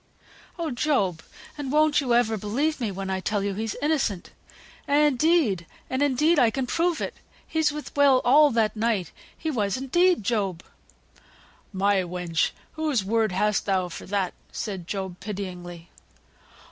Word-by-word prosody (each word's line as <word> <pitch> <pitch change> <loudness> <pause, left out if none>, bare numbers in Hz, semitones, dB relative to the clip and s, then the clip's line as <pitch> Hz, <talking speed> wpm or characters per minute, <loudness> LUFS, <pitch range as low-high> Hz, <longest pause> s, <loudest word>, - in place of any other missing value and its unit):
"Oh! 330 -3 -2
Job, 240 - 0 0.4
and 275 -3 -3
won't 305 0 +4
you 245 -4 +1
ever 230 -2 +2
believe 260 +9 -1
me 225 - 0
when 195 0 -4
I 190 - -1
tell 205 +1 -1
you 200 0 -1
he's 220 +2 -3
innocent? 275 - 0 0.6
Indeed, 290 - +3 0.2
and 260 +1 -1
indeed 295 +4 +3
I 240 - +5
can 260 +3 -2
prove 335 +5 0
it; - - -3 0.3
he 320 - -2
was 310 -2 +3
with 300 0 -8
Will 280 -2 +5
all 295 +4 +6
that 225 -4 +1
night; 215 -6 0 0.3
he 320 - -3
was, 205 -6 0
indeed, 345 - +2
Job!" 195 -6 -1 1.1
"My 200 0 +2
wench! 175 -2 0 0.2
whose 300 -10 -1
word 220 0 +1
hast 210 +3 0
thou 185 -2 +1
for - - -9
that?" 195 -2 -1 0.2
said 190 -6 -5
Job, 190 -3 -4
pityingly. 180 -4 -7
225 Hz, 155 wpm, -25 LUFS, 190-290 Hz, 1.1 s, all